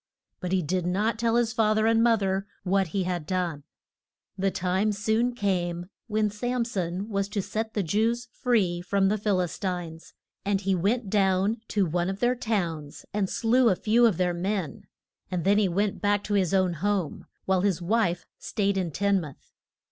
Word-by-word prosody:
But 180 -2 -4
he 190 -2 +2
did 180 +3 -1
not 210 +5 0
tell 230 0 +2
his 235 -2 +2
fath 215 -2 +2
er 215 - +2
and 225 0 +4
moth 230 -3 +3
er 195 +1 -1 0.2
what 195 0 +2
he 190 +4 -1
had 175 -4 -3
done. 175 -5 -1 0.7
The 195 0 +1
time 185 +3 0
soon 220 +4 0
came 175 -4 -1 0.2
when 215 -1 +1
Sam 245 +3 -1
son 185 -2 -3
was 200 -2 -1
to 205 -1 -1
set 220 +2 -4
the 205 - +1
Jews 225 +7 0
free 200 -9 +1
from 195 +2 +1
the 210 - +1
Phil 200 -2 +1
is 175 -3 -4
tines. 175 -4 -5 0.3
And 200 0 +1
he 195 0 +1
went 200 +4 0
down 195 +1 +2
to 200 -2 +1
one 175 +2 0
of 195 +1 -4
their 245 +1 +3
towns 175 -11 -3
and 200 -2 0
slew 240 +1 +3
a 190 - +3
few 230 +5 +4
of 205 -7 0
their 180 -1 +1
men, 185 -1 -3 0.4
and 180 -2 -2
then 200 -1 +3
went 205 0 0
back 205 -1 +2
to 210 - -3
his 190 -4 +2
own 185 -2 +2
home, 200 -6 -1 0.2
while 190 -1 +2
his 190 -3 +1
wife 180 -2 0
stayed 200 -2 0
in 180 -2 -1
Tin 200 +4 +1
muth. 150 -4 -11
195 Hz, 195 wpm, -27 LUFS, 180-215 Hz, 0.7 s, and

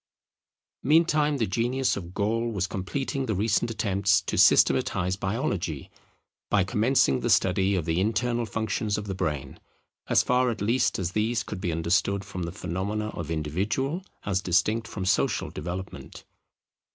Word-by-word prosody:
Meantime 150 0 +3
the 115 - +1
genius 120 +6 0
of 90 -2 -8
Gall 115 +3 0
was 100 -4 -1
completing 130 +9 -3
the 110 - 0
recent 105 +3 +1
attempts 100 -3 +2
to - - -4
systematize 90 +1 +4
biology, 95 - -3 0.6
by 100 -3 +3
commencing 110 - +2
the - - -2
study 95 +1 +3
of 85 -4 -1
the 85 +2 0
internal 115 +3 0
functions 110 0 -1
of 105 - -4
the 100 - -3
brain; 75 -7 -3 0.5
as - - +4
far 125 0 +2
at 115 - -3
least 115 +5 +1
as 90 -2 -2
these 110 +3 0
could 100 -3 -7
be 90 -4 -1
understood 90 +4 0
from 95 -3 -6
the 85 0 -3
phenomena 100 +5 -3
of 85 -6 -6
individual 100 - -1 0.2
as 95 -2 0
distinct 105 +6 +1
from 95 - -5
social 95 - +1
development. 90 +4 -7
100 Hz, 150 wpm, -26 LUFS, 90-115 Hz, 0.6 s, systematize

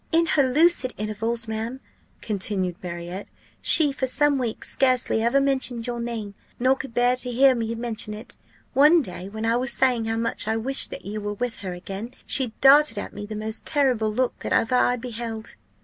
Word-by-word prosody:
"In 335 0 +4
her 310 - +2
lucid 270 0 +2
intervals, 225 +2 -3
ma'am," 225 +4 -4 0.4
continued 190 -3 -2
Marriott, 175 +2 -7 0.3
"she 300 -3 +6
for 265 -1 -2
some 285 +1 +2
weeks 235 -3 -4
scarcely 255 -4 +1
ever 235 +4 +2
mentioned 260 -4 0
your 240 -1 -4
name, 230 -4 -5 0.3
nor 260 +2 +3
could 265 -3 -9
bear 245 +1 +3
to 250 0 -2
hear 265 +2 +5
me 230 -1 -3
mention 225 -2 -3
it. 220 +4 -9 0.3
One 300 +4 +5
day, 180 -2 -8
when 220 +2 -5
I 230 +1 +2
was 250 0 -1
saying 245 -3 +1
how 225 0 -2
much 230 -2 0
I 220 0 0
wished 265 +5 +3
that - - -9
you 210 +2 -5
were 205 0 -3
with 245 +1 -3
her 190 -3 -6
again, 195 +6 -8
she 260 -5 +2
darted 290 +2 +6
at - - -5
me 205 0 -7
the 215 - -6
most 215 +1 -4
terrible 255 -8 +1
look 250 +3 -1
that - - -6
ever 225 - +1
I 250 0 +3
beheld. 230 -2 -6
235 Hz, 195 wpm, -24 LUFS, 215-260 Hz, 0.4 s, she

